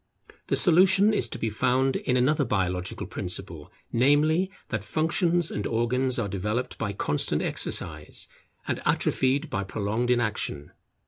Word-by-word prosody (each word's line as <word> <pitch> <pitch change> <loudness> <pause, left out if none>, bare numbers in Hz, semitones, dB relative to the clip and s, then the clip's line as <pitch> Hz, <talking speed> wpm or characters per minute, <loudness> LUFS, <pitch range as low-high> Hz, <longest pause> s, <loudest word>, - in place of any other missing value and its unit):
The - - +1
solution 190 +4 +5
is 125 - +3
to - - -6
be 110 - -2
found 130 +4 +1
in 125 - 0
another 145 +4 +2
biological 90 -5 -2
principle, - - -5 0.2
namely, 150 +8 +3 0.2
that 110 -3 -3
functions 165 - 0
and 105 - -3
organs 125 +3 +1
are 115 -4 -1
developed 105 +6 -3
by 105 -3 -2
constant 75 -7 +1
exercise, - - -2 0.4
and - - -2
atrophied 140 +4 +1
by 100 - -1
prolonged 105 +5 -2
inaction. 110 -11 -1
125 Hz, 135 wpm, -26 LUFS, 105-150 Hz, 0.4 s, solution